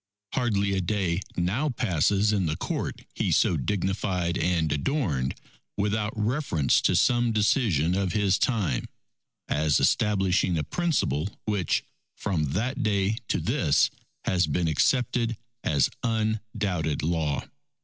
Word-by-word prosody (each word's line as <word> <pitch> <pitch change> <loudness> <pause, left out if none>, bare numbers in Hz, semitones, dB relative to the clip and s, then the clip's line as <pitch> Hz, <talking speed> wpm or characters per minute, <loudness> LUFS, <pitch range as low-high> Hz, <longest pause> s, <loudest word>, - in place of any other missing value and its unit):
Hardly 100 -6 +1
a 95 - +1
day 90 -1 0 0.2
now 100 +13 0
passes 100 - +1
in 95 -4 +1
the 75 - -1
Court - - -4
he - - -1
so 90 - +3
dignified 95 +2 -1
and 85 -3 +1
adorned, 75 - -1 0.4
without 105 +1 0
reference 105 - +1
to - - +2
some 120 -1 +3
decision 105 - +2
of 95 -1 0
his 100 -2 +2
time, 110 -8 0 0.6
as 75 -1 +2
establishing 95 -4 +2
a 75 - 0
principle 95 - 0 0.2
which, 105 -4 0 0.3
from 75 -7 -1
that 130 +8 -1
day 105 -1 +1
to - - 0
this, - - +2 0.3
has 90 -3 +2
been 85 +3 0
accepted 115 - +1 0.3
as 70 -3 +3
undoubted 110 - -1
law. 80 -3 0
95 Hz, 125 wpm, -26 LUFS, 85-110 Hz, 0.6 s, so